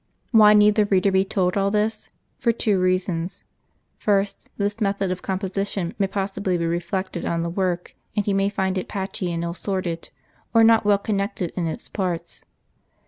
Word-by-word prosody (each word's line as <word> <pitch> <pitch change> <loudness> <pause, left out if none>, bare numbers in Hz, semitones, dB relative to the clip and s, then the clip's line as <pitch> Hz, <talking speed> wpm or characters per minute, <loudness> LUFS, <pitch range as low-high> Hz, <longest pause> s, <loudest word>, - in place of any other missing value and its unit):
Why 210 -3 +7
need 210 0 +6
the 210 -1 +2
reader 195 0 +3
be 190 0 +3
told 185 -2 0
all 200 0 +2
this 215 +1 -1
'i - - -34 0.3
For 235 - +3
two 215 -4 +1
reasons: 185 -1 -1 0.6
First, 200 -1 0
this 205 +2 -2
method 195 -2 0
of 185 - -3
composition 190 -1 -2
may 195 - +2
possibly 195 -1 -1
be 170 - -1
reflected 175 +3 -2
on 170 0 -1
the 170 - -2
work; 180 -1 -2 0.2
and 205 - +1
he 205 - +1
may 195 0 +2
find 190 -2 -1
it - - -6
patchy 190 -2 -3
and 170 0 -2
ill 170 - -2
assorted, 175 -2 -3 0.5
or 225 - +7
not 225 -1 +5
well 205 -1 +5
connected 200 -3 -2
in 175 -3 -1
its 160 - -5
parts. 180 -4 -3
195 Hz, 185 wpm, -23 LUFS, 180-205 Hz, 0.6 s, Why